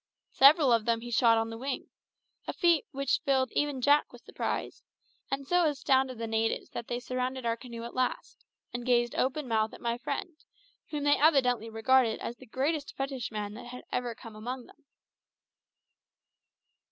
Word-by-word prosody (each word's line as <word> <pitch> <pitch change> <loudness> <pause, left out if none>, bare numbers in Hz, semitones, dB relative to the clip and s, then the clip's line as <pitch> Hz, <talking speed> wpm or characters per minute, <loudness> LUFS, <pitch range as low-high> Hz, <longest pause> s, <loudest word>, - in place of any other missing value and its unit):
Several 275 -1 +6
of 225 -2 +2
them 230 -1 +1
he 240 +1 -7
shot 230 -1 +5
on 225 0 -1
the 225 - -7
wing 270 +1 -4 0.6
a - - -2
feat 340 -5 +3
which 275 +1 0
even 265 -1 +3
filled 290 -3 -1
Jack 290 +2 +4
with - - -15
surprise, - - -3 0.5
and 275 0 -2
so 355 +2 +3
astounded 265 -3 +1
the 230 - -3
natives 225 0 -1
that 235 - -6
they 240 - -2
surrounded 255 0 -3
our 230 0 +1
canoe 235 -1 -9
at 235 - -7
last, 255 -1 -2 0.3
and 240 0 -4
gazed 240 -1 +2
open 270 +2 -1
mouthed 220 -1 0
at - - -13
my 235 0 -2
friend, 310 +6 -4 0.5
whom 295 -2 -3
they 290 0 +4
evidently 250 -7 +3
regarded 225 +1 +3
as 235 - -5
the - - -14
greatest 285 +5 -2
fetishman 230 -7 -3
that 240 +2 -9
had 250 +1 -9
ever 245 -2 -2
come 225 -2 -11
amongst 245 +3 -5
them. 300 - -21
250 Hz, 175 wpm, -29 LUFS, 230-275 Hz, 0.6 s, Several